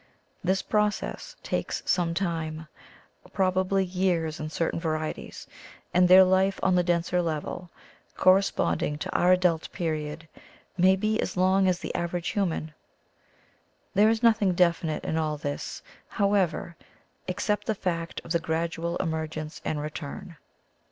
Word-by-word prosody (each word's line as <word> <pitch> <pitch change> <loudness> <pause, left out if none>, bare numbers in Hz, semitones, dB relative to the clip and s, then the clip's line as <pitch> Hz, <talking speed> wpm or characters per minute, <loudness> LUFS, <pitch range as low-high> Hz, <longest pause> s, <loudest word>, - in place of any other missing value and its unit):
This 190 +1 +1
process 210 -1 -1
takes - - -2
some 170 -2 +1
time, 160 -3 -3 0.7
probably 190 0 +1
years 175 -4 0
in 155 - -4
certain 165 +1 -1
varieties, 155 -2 -4 0.5
and 180 0 +5
their 185 +1 +9
life 190 +1 +2
on 190 - +3
the 180 - +4
denser 175 0 +1
level, 170 +2 -4 0.5
corresponding 185 -5 +2
to - - -5
our 180 - +4
adult 180 -3 +1
period, 155 -1 -3 0.5
may 185 +1 +5
be 215 +3 0
as 185 - -4
long 190 +1 +3
as 180 -1 +2
the - - -6
average 170 0 -2
human. 170 -7 -2 1.2
There 210 +3 +5
is 225 +1 0
nothing 215 -5 +4
definite 170 -3 +1
in 160 - -1
all 155 -1 -1
this, 145 -1 -5 0.2
however, 195 -5 0 0.5
except 210 +3 -1
the 220 - +1
fact 170 -4 -3
of 165 - -8
the 170 - +2
gradual 165 +1 -2
emer 160 -2 -1
gence 155 0 -7
and 155 - -2
return. 150 +3 -6
175 Hz, 140 wpm, -27 LUFS, 160-190 Hz, 1.2 s, their